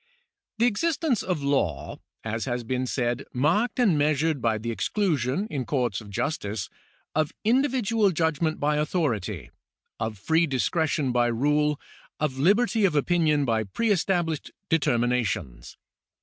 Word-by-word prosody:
The 230 - +3
existence 285 - +1
of 175 -6 -2
law 135 - -1
is, - - -32 0.2
as 110 +1 -3
has 120 -2 -2
been 130 +2 -2
said, 120 +1 -1
marked 175 - +1
and 195 -11 +4
measured 150 0 +1
by 115 -2 +1
the 115 +2 -4
exclusion, 155 - 0
in 140 -3 -2
courts 120 -6 -1
of 105 - -12
justice, 105 -1 -3 0.4
of 155 -1 0
individual 230 -3 +2
judgment 160 -2 0
by 150 +1 +1
authority, 110 - -1 0.5
of 110 -1 -3
free 160 - +2
discretion 145 0 0
by 120 0 +2
rule, 150 +5 +1 0.4
of 135 -3 -1
liberty 215 - +3
of 185 -6 +3
opinion 150 -1 +2
by 110 -3 +1
pre 215 - -1
established 175 -4 0 0.2
determinations. 120 - 0
150 Hz, 135 wpm, -26 LUFS, 120-175 Hz, 0.5 s, and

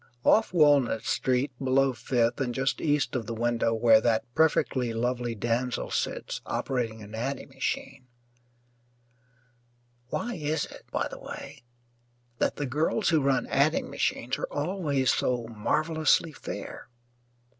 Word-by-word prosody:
Off 220 - +4
Walnut 145 -9 +4
Street, 130 +2 0
below 135 0 +3
Fifth, 120 +1 0
and 120 -3 -1
just 135 -1 0
east 145 -5 +1
of 115 -4 -2
the 115 - -3
window 115 0 +1
where 115 -1 +5
that 115 -2 +2
perfectly 130 -6 +2
lovely 120 0 -1
damsel 120 +3 -1
sits - - -2
operating 115 -4 -2
an 105 +1 -11
adding 130 +6 -4
machine 135 0 -4 2.0
why 240 - -3
is 155 -2 -1
it, - - -13
by - - 0
the - - -9
way, - - -9 0.8
that - - +1
the 145 - -2
girls 155 - +1
who 160 -3 +3
run 135 -1 +2
adding 145 +4 +1
machines - - -1
are - - -4
always 150 - 0
so 125 -2 0
marvellously 155 +8 +1
fair? - - -7
130 Hz, 135 wpm, -28 LUFS, 120-150 Hz, 2.0 s, where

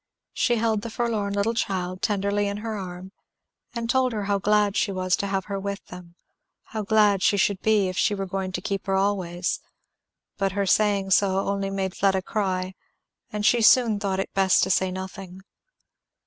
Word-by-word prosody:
She 240 - +1
held 220 -2 0
the 230 - -6
forlorn 220 -3 -2
little 205 +3 0
child 185 -4 -2
tenderly 205 0 0
in 200 0 -3
her 220 -1 -3
arm, 185 -1 -7 0.6
and 230 0 -3
told 255 +1 +2
her 210 -2 -2
how 200 0 0
glad 210 0 +2
she 215 -3 +1
was 185 -1 0
to 200 - -2
have 195 -1 -2
her 200 -1 -4
with 200 0 -5
them, 180 -1 -11 0.5
how 220 - -5
glad 210 -2 +3
she 200 - +3
should 195 0 +1
be 215 -3 +3
if 185 - -3
she 205 - +2
were 195 -1 -3
going 190 0 -3
to 180 - -3
keep 195 +1 -4
her 195 - +1
always; 185 -3 -1 0.8
but 195 -1 0
her 200 0 0
saying 200 -1 +2
so 190 0 +3
only 195 0 -2
made 195 -1 -3
Fleda 190 -1 +1
cry, 185 -3 -2 0.6
and 210 -1 -3
she 240 +1 +4
soon 225 -2 +5
thought 195 -2 -1
it 195 - -4
best 190 -1 +3
to 190 - +1
say 185 +1 +2
nothing. 190 0 -8
195 Hz, 190 wpm, -25 LUFS, 190-210 Hz, 0.8 s, soon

